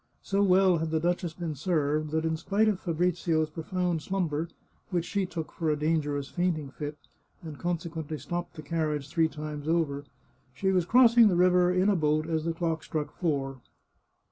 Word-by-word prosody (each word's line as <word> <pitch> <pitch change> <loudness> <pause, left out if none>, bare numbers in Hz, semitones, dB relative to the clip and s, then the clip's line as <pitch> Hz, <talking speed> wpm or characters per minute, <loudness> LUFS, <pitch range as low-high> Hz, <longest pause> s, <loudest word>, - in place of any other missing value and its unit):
So 200 0 0
well 185 -2 +4
had 160 0 -2
the 160 0 +1
duchess 175 0 -1
been 170 -3 -4
served, 150 0 0
that 160 +1 -1
in 160 0 +1
spite 200 +7 +1
of 205 -4 +1
Fabrizio's 170 -2 0
profound 175 +1 -2
slumber, 170 -4 -1 0.4
which 175 -3 -1
she 200 -1 -1
took 165 -3 -5
for 165 -2 -2
a 150 - +2
dangerous 150 -2 0
fainting 165 -6 -1
fit, 150 +1 -6 0.5
and 155 -3 -8
consequently 165 -3 -3
stopped 175 +7 -5
the 155 - -8
carriage 150 -2 -2
three 165 +1 +2
times 150 -1 -6
over, 155 -4 0 0.5
she 190 -1 +1
was 180 -3 +2
crossing 235 -1 +7
the 190 - +2
river 180 0 +4
in 185 +2 +2
a 205 - +4
boat 155 -1 +1
as 160 -1 -1
the 165 - 0
clock 165 -1 -2
struck 150 -2 -3
four. 135 -6 -2
165 Hz, 180 wpm, -28 LUFS, 155-180 Hz, 0.5 s, crossing